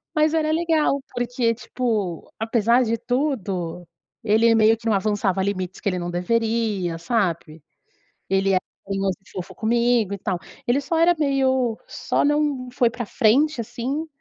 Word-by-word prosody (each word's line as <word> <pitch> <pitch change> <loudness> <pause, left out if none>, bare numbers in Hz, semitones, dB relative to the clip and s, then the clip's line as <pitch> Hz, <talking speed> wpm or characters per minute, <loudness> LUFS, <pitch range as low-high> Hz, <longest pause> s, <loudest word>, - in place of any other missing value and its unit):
Mas 310 0 +3
era 310 -1 +1
legal 315 -3 +2
porque, 245 -1 0
tipo, 220 -8 -3
apesar 230 +2 +2
de 230 0 -1
tudo, 205 - -2 0.4
ele 225 +2 +4
meio 220 0 +5
que 225 0 -13
não 220 - +3
avançava 200 -1 +1
limites 190 -2 -3
que - - -1
ele 185 -2 -1
não 175 0 -3
deveria, 210 -2 0
sabe, 170 - -2 0.7
ele 195 0 +2
era 185 -1 +3 0.2
carinhoso 195 -1 -1
e - - -19
fofo 185 -1 -7
comigo 235 -2 +1
e 200 - -3
tal. 185 -2 -2 0.3
Ele 250 +4 +3
só 320 +4 -1
era 340 +1 +4
meio 260 -5 +1
só - - -1
não 290 -3 0
foi 245 -1 +2
pra 240 -1 -5
frente, 255 +8 +2
assim, 250 +7 -4
230 Hz, 155 wpm, -23 LUFS, 195-255 Hz, 0.7 s, meio